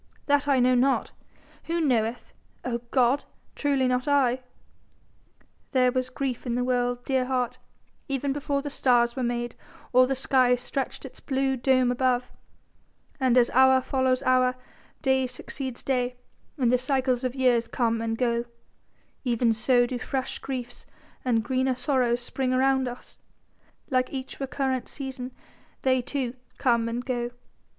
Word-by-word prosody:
That 285 Hz, 0 st, +2 dB
I 275 Hz, -2 st, +4 dB
know 250 Hz, +1 st, +4 dB
not! 260 Hz, +2 st, +2 dB, 0.5 s
Who 335 Hz, +1 st, -1 dB
knoweth, 240 Hz, -6 st, 0 dB, 0.3 s
oh 240 Hz, -1 st, -1 dB
God? 255 Hz, +2 st, +2 dB, 0.3 s
Truly 275 Hz, -3 st, +1 dB
not 250 Hz, +2 st, 0 dB
I. 260 Hz, -3 st, +3 dB, 1.3 s
There 255 Hz, -1 st, +4 dB
was 255 Hz, 0 st, -1 dB
grief 255 Hz, -1 st, -3 dB
in 235 Hz, -, 0 dB
the 245 Hz, -, 0 dB
world, 245 Hz, -1 st, 0 dB
dear 260 Hz, -2 st, +1 dB
heart, 250 Hz, -2 st, -1 dB, 0.5 s
even 275 Hz, 0 st, -1 dB
before 285 Hz, -1 st, -2 dB
the 290 Hz, -, -4 dB
stars 240 Hz, -3 st, +3 dB
were 260 Hz, -, -3 dB
made 240 Hz, -1 st, -2 dB, 0.4 s
or 255 Hz, +1 st, +6 dB
the 270 Hz, -, 0 dB
sky 255 Hz, -1 st, +3 dB
stretched 255 Hz, +2 st, -4 dB
its -, -, -11 dB
blue 270 Hz, -1 st, 0 dB
dome 255 Hz, 0 st, +3 dB
above; 250 Hz, 0 st, 0 dB, 0.9 s
and 255 Hz, -2 st, +3 dB
as 240 Hz, -1 st, +4 dB
hour 260 Hz, +1 st, +6 dB
follows 260 Hz, 0 st, 0 dB
hour, 255 Hz, -1 st, +3 dB, 0.5 s
day 265 Hz, -1 st, +2 dB
succeeds 250 Hz, 0 st, -6 dB
day 250 Hz, -2 st, 0 dB, 0.4 s
and 245 Hz, -4 st, +2 dB
the 250 Hz, -, +3 dB
cycles 260 Hz, -1 st, 0 dB
of 255 Hz, 0 st, -2 dB
years 250 Hz, -3 st, +2 dB
come 230 Hz, -2 st, 0 dB
and 225 Hz, 0 st, -2 dB
go, 235 Hz, -1 st, 0 dB, 0.8 s
even 235 Hz, -2 st, +2 dB
so 245 Hz, +2 st, +3 dB
do 245 Hz, 0 st, -4 dB
fresh 265 Hz, +2 st, -3 dB
griefs 250 Hz, -3 st, -6 dB, 0.4 s
and 230 Hz, -3 st, +1 dB
greener 260 Hz, +2 st, 0 dB
sorrows 250 Hz, -2 st, +1 dB
spring 255 Hz, +1 st, -2 dB
around 265 Hz, 0 st, +2 dB
us; 245 Hz, 0 st, -9 dB, 0.7 s
like 255 Hz, -1 st, +1 dB
each 265 Hz, -1 st, -6 dB
recurrent 265 Hz, -2 st, -2 dB
season 265 Hz, -2 st, -5 dB, 0.5 s
they 260 Hz, -1 st, +3 dB
too 250 Hz, -1 st, -3 dB, 0.2 s
come 235 Hz, -2 st, +2 dB
and 240 Hz, +2 st, -4 dB
go. 240 Hz, -2 st, -2 dB
255 Hz, 150 wpm, -26 LUFS, 245-265 Hz, 1.3 s, or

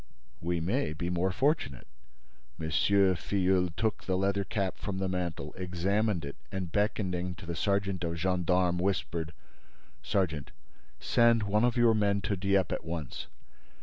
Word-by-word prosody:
"We 85 Hz, +1 st, 0 dB
may 90 Hz, -, 0 dB
be 85 Hz, +2 st, -3 dB
more 90 Hz, +2 st, +1 dB
fortunate." 135 Hz, -, 0 dB, 0.7 s
M. 80 Hz, -1 st, -3 dB
Filleul 95 Hz, +1 st, +3 dB
took 110 Hz, -1 st, 0 dB
the 95 Hz, -1 st, +1 dB
leather 100 Hz, +1 st, +1 dB
cap 100 Hz, -2 st, -2 dB
from 100 Hz, -2 st, -3 dB
the 95 Hz, 0 st, -1 dB
mantel, 85 Hz, -5 st, -3 dB
examined 95 Hz, +1 st, 0 dB
it 70 Hz, -, -7 dB
and, 95 Hz, -3 st, -3 dB
beckoning 90 Hz, -3 st, 0 dB
to -, -, -11 dB
the 85 Hz, 0 st, -4 dB
sergeant 100 Hz, 0 st, 0 dB
of 85 Hz, 0 st, -2 dB
gendarmes, 90 Hz, 0 st, +1 dB
whispered: 85 Hz, -4 st, -1 dB, 0.7 s
"Sergeant, 85 Hz, -8 st, -1 dB, 0.5 s
send 115 Hz, -2 st, +4 dB
one 105 Hz, +2 st, +2 dB
of 125 Hz, 0 st, +2 dB
your 120 Hz, -1 st, +5 dB
men 100 Hz, -2 st, +2 dB
to 100 Hz, -, -1 dB
Dieppe 95 Hz, 0 st, +1 dB
at -, -, -3 dB
once. 80 Hz, -4 st, -5 dB
95 Hz, 150 wpm, -30 LUFS, 85-100 Hz, 0.7 s, your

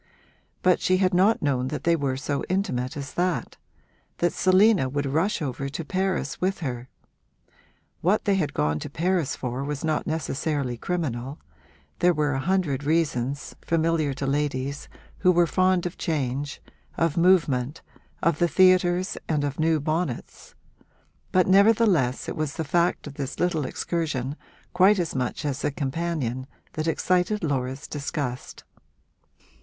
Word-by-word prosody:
But 180 Hz, -1 st, +4 dB
she 185 Hz, -, +3 dB
had 185 Hz, 0 st, +2 dB
not 195 Hz, +5 st, +3 dB
known 130 Hz, -3 st, +1 dB
they 165 Hz, +4 st, +1 dB
were 140 Hz, -4 st, -1 dB
so 140 Hz, 0 st, -2 dB
intimate 135 Hz, -10 st, -1 dB
as 140 Hz, -1 st, -6 dB
that 175 Hz, -8 st, -1 dB, 0.6 s
that 170 Hz, -2 st, +1 dB
Selina 185 Hz, -5 st, +4 dB
would 145 Hz, +2 st, -2 dB
rush 160 Hz, +7 st, 0 dB
over 140 Hz, 0 st, -3 dB
to 150 Hz, +3 st, -5 dB
Paris 185 Hz, -3 st, -1 dB
with 190 Hz, 0 st, 0 dB
her. 125 Hz, -4 st, -4 dB, 1.1 s
What 190 Hz, +6 st, +2 dB
they 200 Hz, -, +3 dB
had 165 Hz, -7 st, -1 dB
gone 75 Hz, +1 st, +1 dB
to -, -, -6 dB
Paris 170 Hz, -1 st, 0 dB
for 125 Hz, +1 st, -4 dB
was 145 Hz, 0 st, -4 dB
not 155 Hz, -1 st, -1 dB
necessarily 145 Hz, -4 st, -2 dB
criminal; 140 Hz, -2 st, -3 dB, 0.6 s
there 175 Hz, -1 st, +4 dB
were 150 Hz, -1 st, +1 dB
a 135 Hz, -, -1 dB
hundred 155 Hz, -3 st, 0 dB
reasons, 145 Hz, -3 st, -1 dB
familiar 165 Hz, -2 st, +1 dB
to 140 Hz, -, -3 dB
ladies 140 Hz, 0 st, -2 dB, 0.3 s
who 185 Hz, -, +5 dB
were 175 Hz, -1 st, +4 dB
fond 185 Hz, +1 st, +2 dB
of 175 Hz, -, -5 dB
change, 140 Hz, -2 st, -2 dB, 0.3 s
of 165 Hz, -3 st, +1 dB
movement, 160 Hz, -7 st, +2 dB, 0.4 s
of 170 Hz, -2 st, +2 dB
the 175 Hz, -, +4 dB
theatres 185 Hz, 0 st, +3 dB
and 150 Hz, -3 st, +1 dB
of 145 Hz, +1 st, -3 dB
new 160 Hz, 0 st, +3 dB
bonnets; 155 Hz, -2 st, -3 dB, 0.8 s
but 185 Hz, -1 st, +4 dB
nevertheless 195 Hz, -, +4 dB
it -, -, -4 dB
was 155 Hz, -1 st, -2 dB
the 160 Hz, -, -2 dB
fact 170 Hz, +3 st, +1 dB
of 145 Hz, -, -7 dB
this 140 Hz, -1 st, -5 dB
little 165 Hz, -6 st, 0 dB
excursion 145 Hz, -6 st, -2 dB, 0.4 s
quite 190 Hz, +3 st, +5 dB
as 170 Hz, -3 st, -1 dB
much 130 Hz, +3 st, -2 dB
as 140 Hz, -1 st, -2 dB
the -, -, +1 dB
companion 140 Hz, -3 st, -3 dB, 0.3 s
that 155 Hz, +1 st, -3 dB
excited 180 Hz, +5 st, +1 dB
Laura's 135 Hz, -3 st, -2 dB
disgust. 140 Hz, -3 st, -4 dB
155 Hz, 150 wpm, -25 LUFS, 135-180 Hz, 1.1 s, who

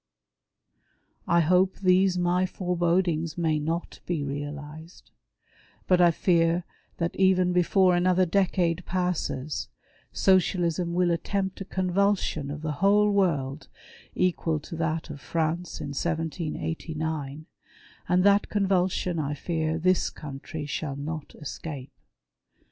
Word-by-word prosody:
I 170 Hz, -, +4 dB
hope 180 Hz, +3 st, +3 dB
these 185 Hz, -1 st, +3 dB
my 180 Hz, +1 st, +2 dB
forebodings 175 Hz, -3 st, 0 dB
may 160 Hz, -3 st, +1 dB
not 165 Hz, +3 st, -3 dB
be 165 Hz, -5 st, -1 dB
realized, 145 Hz, +4 st, -7 dB, 0.7 s
but 180 Hz, -1 st, +4 dB
I 175 Hz, -, +7 dB
fear 170 Hz, 0 st, +2 dB, 0.3 s
that 170 Hz, 0 st, -2 dB
even 185 Hz, -1 st, +3 dB
before 180 Hz, +1 st, +4 dB
another 180 Hz, +1 st, +3 dB
decade 180 Hz, -1 st, +1 dB
passes, 175 Hz, -6 st, -2 dB, 0.4 s
Socialism 175 Hz, -2 st, +2 dB
Avill 175 Hz, -1 st, +3 dB
attempt 190 Hz, +3 st, -2 dB
a -, -, -4 dB
convulsion 185 Hz, -5 st, 0 dB
of 150 Hz, +2 st, -6 dB
the 155 Hz, -, -1 dB
Avhole 205 Hz, +1 st, +4 dB
world 150 Hz, -7 st, 0 dB, 0.5 s
equal 170 Hz, -3 st, +1 dB
to 165 Hz, -, -8 dB
that 160 Hz, -1 st, -2 dB
of 145 Hz, -2 st, -9 dB
France 165 Hz, +2 st, -2 dB
in -, -, -5 dB
1789; 160 Hz, -1 st, -3 dB, 0.6 s
and 180 Hz, 0 st, +3 dB
that 200 Hz, +1 st, +4 dB
convulsion 185 Hz, -3 st, +1 dB
I 145 Hz, -1 st, -2 dB
fear 160 Hz, +1 st, -2 dB
this 185 Hz, +2 st, +2 dB
country 145 Hz, +1 st, -7 dB
shall 145 Hz, -1 st, -3 dB
not 150 Hz, +1 st, -6 dB
escape. 145 Hz, -2 st, -7 dB
170 Hz, 115 wpm, -26 LUFS, 155-185 Hz, 0.7 s, I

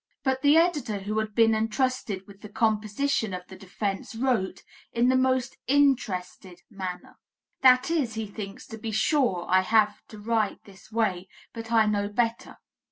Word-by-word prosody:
But 265 Hz, -1 st, 0 dB
the 290 Hz, +3 st, +5 dB
editor 295 Hz, -, +1 dB
who 215 Hz, +2 st, -2 dB
had 215 Hz, -1 st, -4 dB
been 225 Hz, -1 st, +5 dB
entrusted 220 Hz, -3 st, -1 dB
with 200 Hz, 0 st, -16 dB
the 210 Hz, -, -10 dB
composition 220 Hz, +1 st, 0 dB
of 180 Hz, -, -7 dB
the 190 Hz, -, -11 dB
defence, 195 Hz, +3 st, -4 dB
wrote, 230 Hz, -6 st, -1 dB, 0.3 s
"in 240 Hz, +2 st, +2 dB
the 260 Hz, -, +3 dB
most 260 Hz, -1 st, +1 dB
interested 200 Hz, -10 st, 0 dB
manner." 185 Hz, -3 st, -7 dB, 0.4 s
That 255 Hz, +3 st, +5 dB
is, 270 Hz, -10 st, 0 dB
he 220 Hz, 0 st, -3 dB
thinks 200 Hz, -1 st, -8 dB
"To 225 Hz, -, -8 dB
be 225 Hz, -, -5 dB
sure, 215 Hz, -, +1 dB
I 185 Hz, +1 st, +4 dB
have 215 Hz, +2 st, +2 dB
to 215 Hz, -, -12 dB
write 215 Hz, 0 st, -1 dB
this 200 Hz, +2 st, -17 dB
way, 195 Hz, -5 st, -1 dB, 0.3 s
but 225 Hz, -1 st, -8 dB
I 225 Hz, -1 st, +5 dB
know 205 Hz, -1 st, 0 dB
better." 230 Hz, +2 st, -2 dB
220 Hz, 165 wpm, -26 LUFS, 200-255 Hz, 0.4 s, the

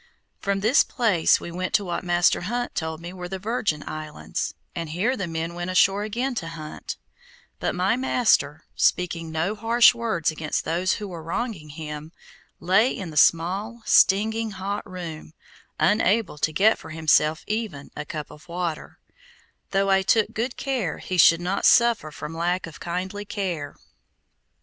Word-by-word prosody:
From 195 Hz, 0 st, -1 dB
this 225 Hz, +8 st, +5 dB
place 215 Hz, -, +2 dB
we 170 Hz, -, -7 dB
went 185 Hz, +1 st, -2 dB
to 205 Hz, -, +2 dB
what 175 Hz, 0 st, -3 dB
Master 175 Hz, -1 st, +3 dB
Hunt 240 Hz, +6 st, -3 dB
told 160 Hz, -1 st, -3 dB
me 175 Hz, +2 st, -7 dB
were 180 Hz, -1 st, -7 dB
the 190 Hz, -, -4 dB
Virgin 200 Hz, -6 st, -1 dB
islands, 150 Hz, -, -5 dB, 0.2 s
and 165 Hz, -2 st, -4 dB
here 195 Hz, +11 st, 0 dB
the 195 Hz, -7 st, -3 dB
men 165 Hz, +1 st, -3 dB
went 175 Hz, +1 st, -4 dB
ashore 195 Hz, +2 st, +3 dB
again 240 Hz, +6 st, -2 dB
to 165 Hz, -, -7 dB
hunt; 155 Hz, -2 st, -7 dB, 0.6 s
but -, -, -1 dB
my 185 Hz, +5 st, +2 dB
master, 215 Hz, -, +2 dB
speaking 165 Hz, -2 st, +1 dB
no 160 Hz, +6 st, 0 dB
harsh 230 Hz, +3 st, +5 dB
words 225 Hz, -10 st, -1 dB
against 155 Hz, -1 st, -3 dB
those 175 Hz, +4 st, +1 dB
who 210 Hz, -, -4 dB
were 175 Hz, -3 st, -7 dB
wronging 170 Hz, -1 st, -4 dB
him, 150 Hz, +1 st, -7 dB, 0.5 s
lay 190 Hz, +8 st, +4 dB
in 185 Hz, -5 st, -5 dB
the -, -, -11 dB
small, 195 Hz, +10 st, +2 dB
stinging 220 Hz, +3 st, +4 dB
hot 200 Hz, +1 st, -5 dB
room, 165 Hz, -4 st, -7 dB, 0.5 s
unable 210 Hz, -5 st, +2 dB
to 155 Hz, -, +1 dB
get 205 Hz, +8 st, +3 dB
for -, -, -11 dB
himself 155 Hz, 0 st, +2 dB
even 210 Hz, -10 st, -4 dB
a 150 Hz, -, -4 dB
cup 150 Hz, 0 st, -6 dB
of 150 Hz, +4 st, -15 dB
water, 170 Hz, -2 st, -4 dB, 0.7 s
though 195 Hz, 0 st, +1 dB
I 190 Hz, 0 st, +4 dB
took 215 Hz, +3 st, +2 dB
good 240 Hz, +3 st, -3 dB
care 270 Hz, -4 st, -2 dB
he 185 Hz, -, -4 dB
should 165 Hz, +1 st, +7 dB
not 185 Hz, +3 st, -2 dB
suffer 235 Hz, -9 st, +4 dB
from 150 Hz, +1 st, -7 dB
lack 175 Hz, +2 st, 0 dB
of 165 Hz, -, -11 dB
kindly 185 Hz, +4 st, -4 dB
care. 185 Hz, -8 st, -4 dB
180 Hz, 165 wpm, -24 LUFS, 160-210 Hz, 0.7 s, should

